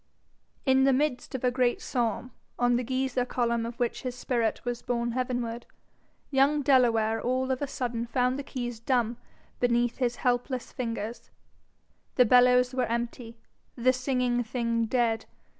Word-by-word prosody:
In 265 Hz, -1 st, +4 dB
the 270 Hz, 0 st, +4 dB
midst 265 Hz, -1 st, -1 dB
of 260 Hz, -, -4 dB
a 250 Hz, -, +3 dB
great 245 Hz, -1 st, +1 dB
psalm, 245 Hz, 0 st, -2 dB, 0.3 s
on 245 Hz, 0 st, +3 dB
the 245 Hz, -, +1 dB
geyser 260 Hz, 0 st, -1 dB
column 235 Hz, -2 st, -1 dB
of 235 Hz, +1 st, -8 dB
which 240 Hz, -1 st, -1 dB
his 255 Hz, -2 st, -4 dB
spirit 240 Hz, -3 st, -1 dB
was 245 Hz, -1 st, -3 dB
borne 235 Hz, -1 st, -1 dB
heavenward, 245 Hz, -1 st, -3 dB, 0.6 s
young 280 Hz, +2 st, +3 dB
Delaware 230 Hz, -5 st, +3 dB
all 260 Hz, +1 st, 0 dB
of 260 Hz, -, -2 dB
a 285 Hz, -, -1 dB
sudden 240 Hz, -3 st, -3 dB
found 250 Hz, +2 st, 0 dB
the -, -, -4 dB
keys 245 Hz, -4 st, -5 dB
dumb 235 Hz, -1 st, 0 dB, 0.4 s
beneath 240 Hz, -1 st, +1 dB
his 245 Hz, -2 st, 0 dB
helpless 250 Hz, +1 st, -1 dB
fingers: 230 Hz, -3 st, -5 dB, 0.9 s
the 250 Hz, -, +6 dB
bellows 250 Hz, +1 st, +5 dB
was 255 Hz, -2 st, 0 dB
empty, 235 Hz, 0 st, -4 dB, 0.4 s
the 255 Hz, +1 st, +3 dB
singing 250 Hz, -2 st, 0 dB
thing 230 Hz, -1 st, -1 dB
dead. 230 Hz, -2 st, 0 dB
245 Hz, 155 wpm, -28 LUFS, 235-255 Hz, 0.9 s, the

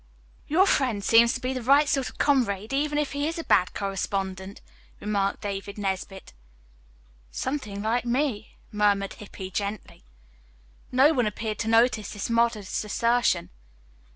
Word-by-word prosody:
"Your 355 Hz, +6 st, +4 dB
friend 250 Hz, -, +1 dB
seems 230 Hz, +3 st, +5 dB
to -, -, -3 dB
be 255 Hz, +1 st, -2 dB
the 255 Hz, -, -4 dB
right 280 Hz, +5 st, +4 dB
sort 270 Hz, -2 st, 0 dB
of -, -, -17 dB
comrade, 225 Hz, -6 st, +1 dB
even 295 Hz, +2 st, 0 dB
if 295 Hz, -2 st, 0 dB
he 285 Hz, +1 st, -1 dB
is 330 Hz, +2 st, -3 dB
a 330 Hz, -, -4 dB
bad 180 Hz, -, +2 dB
correspondent," 195 Hz, -1 st, -3 dB, 0.4 s
remarked 200 Hz, -1 st, -1 dB
David 200 Hz, 0 st, -5 dB
Nesbit. 195 Hz, -, -4 dB, 1.0 s
"Something 210 Hz, -, -4 dB
like 230 Hz, +3 st, 0 dB
me," 240 Hz, -3 st, -2 dB
murmured 205 Hz, -2 st, +1 dB
Hippy 190 Hz, -2 st, -9 dB
gently. 200 Hz, +1 st, -5 dB, 0.9 s
No 270 Hz, +5 st, +5 dB
one 245 Hz, -6 st, +1 dB
appeared 215 Hz, +1 st, -4 dB
to -, -, -2 dB
notice 225 Hz, -2 st, +2 dB
this 205 Hz, +2 st, -4 dB
modest 230 Hz, -4 st, 0 dB
assertion. 230 Hz, -4 st, +1 dB
220 Hz, 145 wpm, -26 LUFS, 200-260 Hz, 1.0 s, seems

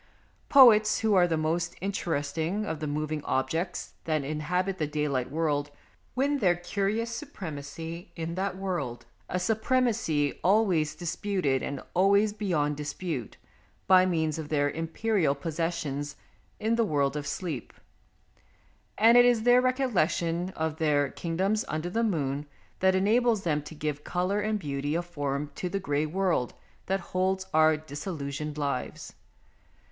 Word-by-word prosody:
Poets, 220 Hz, -6 st, +7 dB
who 220 Hz, -1 st, +2 dB
are 180 Hz, -2 st, +5 dB
the 165 Hz, -2 st, 0 dB
most 165 Hz, +2 st, -1 dB
interesting 165 Hz, 0 st, -2 dB
of 160 Hz, -6 st, -3 dB
the 155 Hz, -, -3 dB
moving 150 Hz, 0 st, -2 dB
objects 165 Hz, +7 st, -2 dB
that 155 Hz, -3 st, 0 dB
inhabit 180 Hz, +6 st, -1 dB
the 155 Hz, -, 0 dB
daylight 145 Hz, -4 st, -1 dB
world, 145 Hz, -1 st, 0 dB, 0.5 s
win 280 Hz, +2 st, +1 dB
their 180 Hz, -6 st, +3 dB
curious 200 Hz, +6 st, -2 dB
supremacy 165 Hz, -, -7 dB
in 165 Hz, 0 st, -4 dB
that 190 Hz, +1 st, -2 dB
world, 175 Hz, -11 st, -3 dB, 0.2 s
a -, -, -1 dB
supremacy 220 Hz, -, +1 dB
always 185 Hz, -6 st, +3 dB
disputed 170 Hz, -5 st, -1 dB
and 140 Hz, -2 st, -4 dB
always 200 Hz, +3 st, +4 dB
beyond 160 Hz, -9 st, 0 dB
dispute, 150 Hz, -, -4 dB, 0.5 s
by 185 Hz, -1 st, +6 dB
means 160 Hz, -3 st, 0 dB
of 150 Hz, -2 st, -6 dB
their 145 Hz, -2 st, +1 dB
imperial 165 Hz, -1 st, 0 dB
possessions 155 Hz, -2 st, -3 dB, 0.4 s
in 225 Hz, +2 st, +1 dB
the 230 Hz, -, +4 dB
world 145 Hz, -, +1 dB
of 145 Hz, -1 st, -3 dB
sleep, 165 Hz, -9 st, -4 dB, 1.3 s
and 230 Hz, +3 st, +7 dB
it -, -, +8 dB
is 240 Hz, -2 st, +3 dB
their 245 Hz, +1 st, +6 dB
recollection 185 Hz, -, +1 dB
of 160 Hz, -1 st, -2 dB
their 145 Hz, -3 st, +2 dB
kingdoms 190 Hz, +6 st, -1 dB
under 155 Hz, +3 st, -3 dB
the 230 Hz, +4 st, +1 dB
moon 145 Hz, -8 st, -1 dB, 0.3 s
that 190 Hz, 0 st, +4 dB
enables 220 Hz, +2 st, +3 dB
them 150 Hz, -3 st, +1 dB
to 155 Hz, +2 st, -10 dB
give 150 Hz, -1 st, -3 dB
colour 180 Hz, +3 st, 0 dB
and 215 Hz, +1 st, 0 dB
beauty 145 Hz, -3 st, -3 dB
of 170 Hz, +1 st, -1 dB
form 145 Hz, -3 st, -3 dB
to 180 Hz, -, -4 dB
the 195 Hz, -, -2 dB
grey 150 Hz, -4 st, 0 dB
world 175 Hz, -7 st, 0 dB, 0.3 s
that 195 Hz, +1 st, +1 dB
holds 190 Hz, +1 st, +1 dB
our 155 Hz, 0 st, +5 dB
disillusioned 150 Hz, -1 st, -5 dB
lives. 140 Hz, -3 st, -3 dB
170 Hz, 140 wpm, -28 LUFS, 150-195 Hz, 1.3 s, it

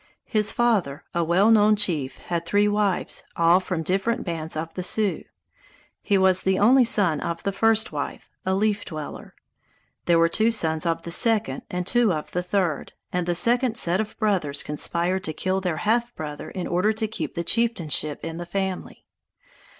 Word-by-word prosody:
His 210 Hz, -2 st, +1 dB
father, 210 Hz, -13 st, 0 dB
a 170 Hz, -, +1 dB
well 185 Hz, +7 st, +3 dB
known 215 Hz, -1 st, +5 dB
chief, 155 Hz, -10 st, 0 dB
had 170 Hz, -1 st, -3 dB
three 205 Hz, +5 st, +2 dB
wives, 205 Hz, -2 st, 0 dB
all 170 Hz, +2 st, +4 dB
from 180 Hz, -3 st, -3 dB
different 195 Hz, +7 st, 0 dB
bands 160 Hz, -3 st, -4 dB
of 160 Hz, +1 st, -5 dB
the 185 Hz, -, -4 dB
Sioux. 205 Hz, +2 st, 0 dB, 0.8 s
He 200 Hz, -, +1 dB
was 190 Hz, -1 st, +4 dB
the 190 Hz, 0 st, +1 dB
only 250 Hz, +6 st, +5 dB
son 190 Hz, -9 st, +2 dB
of 170 Hz, 0 st, -4 dB
the 200 Hz, -, 0 dB
first 225 Hz, +3 st, +2 dB
wife, -, -, -5 dB, 0.2 s
a 190 Hz, 0 st, 0 dB
Leaf 205 Hz, 0 st, 0 dB
Dweller. 155 Hz, -3 st, -8 dB, 0.7 s
There 170 Hz, -1 st, +4 dB
were 165 Hz, 0 st, +4 dB
two 220 Hz, +7 st, +2 dB
sons 165 Hz, -6 st, 0 dB
of 165 Hz, 0 st, -1 dB
the 170 Hz, -, -6 dB
second 215 Hz, -, +1 dB
and 180 Hz, 0 st, -3 dB
two 235 Hz, +1 st, +2 dB
of 155 Hz, -3 st, -4 dB
the 180 Hz, -, -1 dB
third 180 Hz, -4 st, -2 dB
wife, -, -, -45 dB, 0.2 s
and 180 Hz, -1 st, -1 dB
the 175 Hz, -, +1 dB
second 240 Hz, +4 st, +2 dB
set 175 Hz, +4 st, +1 dB
of 215 Hz, -, -7 dB
brothers 180 Hz, -10 st, 0 dB
conspired 170 Hz, +5 st, -1 dB
to 155 Hz, -, -3 dB
kill 185 Hz, +4 st, -1 dB
their 180 Hz, -4 st, -2 dB
half 235 Hz, +2 st, 0 dB
brother 150 Hz, -2 st, -6 dB
in 185 Hz, -2 st, -5 dB
order 180 Hz, +5 st, +1 dB
to 220 Hz, 0 st, -2 dB
keep 220 Hz, -, -5 dB
the 170 Hz, -, -2 dB
chieftainship 170 Hz, -9 st, 0 dB
in 165 Hz, 0 st, -5 dB
the 175 Hz, -, -5 dB
family. 190 Hz, 0 st, -4 dB
185 Hz, 190 wpm, -24 LUFS, 165-215 Hz, 0.8 s, known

